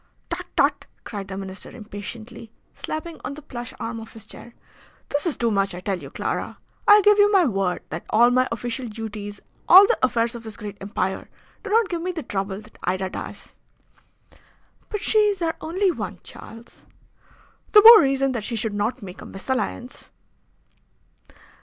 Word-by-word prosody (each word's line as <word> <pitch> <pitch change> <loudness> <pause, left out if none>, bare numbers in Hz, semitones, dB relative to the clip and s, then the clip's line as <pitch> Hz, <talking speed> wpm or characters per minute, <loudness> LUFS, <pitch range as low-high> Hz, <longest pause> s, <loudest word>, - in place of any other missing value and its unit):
"Tut, - - -4
tut!" - - +2 0.2
cried 200 -3 -6
the 190 -1 -6
Minister 190 0 -7
impatiently, 220 +1 -9 0.2
slapping 315 +1 -6
on 280 - -5
the 305 - -10
plush 240 -4 -7
arm 230 0 -4
of 225 0 -11
his 220 -1 -12
chair. 235 +2 -13 0.5
"This 290 +4 -1
is 320 - -2
too 235 -1 +1
much. 195 -2 0
I - - -6
tell 190 0 -2
you, 140 -4 -10
Clara, - - -4 0.3
I 415 0 +8
give 415 +1 +5
you 410 0 +6
my 385 -4 +5
word, 195 -7 -1
that 160 - -5
all 240 +2 +5
my 255 +1 +3
official 240 +2 -4
duties, 210 -2 -7 0.3
all 380 +3 +10
the 475 - +1
affairs 235 -2 +1
of 235 - -7
this 220 -2 -9
great 205 -1 -8
empire, 190 -1 -3 0.3
do 420 - -6
not 445 0 +3
give 345 -2 -3
me 365 +2 -2
the 330 -4 -5
trouble 195 -3 -3
that 215 +1 -18
Ida 185 +1 -1
does." - - -8 1.4
"But 420 -2 -4
she 435 - +3
is 415 -2 +2
our 325 -1 0
only 370 +4 +1
one, - - -5
Charles." 230 +1 -13 0.9
"The 420 -1 +9
more 455 -1 +11
reason 270 0 +1
that 235 -4 -3
she 230 - -3
should 220 -1 -2
not 210 +4 -2
make 185 -2 -9
a - - -9
mesalliance." 250 +3 -4
235 Hz, 180 wpm, -23 LUFS, 205-320 Hz, 1.4 s, more